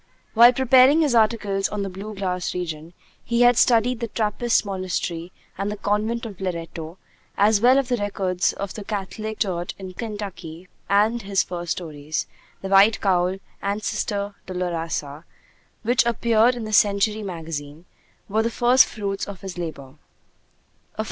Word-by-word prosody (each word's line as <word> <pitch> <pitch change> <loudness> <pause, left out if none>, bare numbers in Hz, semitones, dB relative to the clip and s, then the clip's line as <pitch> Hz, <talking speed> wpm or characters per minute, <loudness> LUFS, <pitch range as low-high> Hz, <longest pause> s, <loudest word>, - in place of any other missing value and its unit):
While 235 +2 +8
preparing 260 +4 +5
his 295 -5 +2
articles 215 -4 +2
on 210 -1 -3
'The 195 - -4
Blue 205 +3 -7
Grass 180 -2 -3
Region,' 165 -2 -5 0.3
he 235 +1 0
had 245 0 +6
studied 235 +1 +3
the 235 - -2
Trappist 225 +1 0
Monastery 185 -3 -3 0.3
and 200 +1 -1
the 210 - -5
Convent 215 +4 -1
of 200 -4 -9
Loretto, 170 -2 -5 0.4
as 205 +1 +4
well 250 +3 +6
as 270 -2 0
the 245 - +1
records 190 -3 0
of 200 -1 -5
the 210 - -7
Catholic 215 +2 -5
Church 175 -4 -2
in 190 -1 -8
Kentucky; 195 -6 -7 0.2
and 215 +4 +3
his 195 -2 +1
first 175 -1 -3
stories, 155 -3 -4 0.4
'The 195 - -4
White 200 +3 +5
Cowl' 185 -1 +1 0.2
and 200 +2 -2
'Sister 205 -2 -2
Dolorosa,' 165 -5 -3 0.6
which 245 +3 +3
appeared 235 +1 +3
in 240 - -5
the 215 0 -5
Century 210 +1 +3
Magazine, 165 -4 -6 0.4
were 215 +2 +1
the 230 - 0
first 245 +2 +5
fruits 200 -1 -4
of 200 -2 -8
this 190 -2 -7
labor. 155 -5 -7
200 Hz, 155 wpm, -23 LUFS, 180-225 Hz, 0.6 s, While